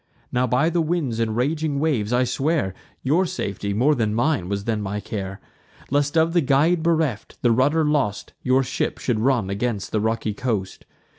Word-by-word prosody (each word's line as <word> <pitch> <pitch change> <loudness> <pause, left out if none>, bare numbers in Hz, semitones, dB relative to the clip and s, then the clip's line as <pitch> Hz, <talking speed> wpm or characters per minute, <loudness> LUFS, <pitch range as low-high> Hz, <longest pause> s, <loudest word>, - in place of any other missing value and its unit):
Now 125 +1 +1
by 135 +8 +2
the 170 0 +1
winds 155 -8 -1
and 110 -1 0
raging 150 +2 0
waves 130 -9 0
I 125 +1 +3
swear, 135 - 0 0.3
Your 165 +8 +2
safety, 100 - -3
more 125 +9 +3
than 110 -5 0
mine, 120 - +1
was 100 0 -2
then 110 -1 -1
my 105 +1 -3
care; 100 -2 -5 0.5
Lest, 145 +3 +1
of 160 +1 +3
the 175 - +4
guide 155 +5 +3
bereft, 160 -8 0
the 120 - +4
rudder 145 +7 +3
lost, 145 -9 0
Your 130 +1 +3
ship 130 +1 -2
should 120 -4 -1
run 115 -5 +1
against 105 0 -2
the 110 - 0
rocky 110 -1 -1
coast. 105 -4 -3
125 Hz, 180 wpm, -23 LUFS, 110-150 Hz, 0.5 s, the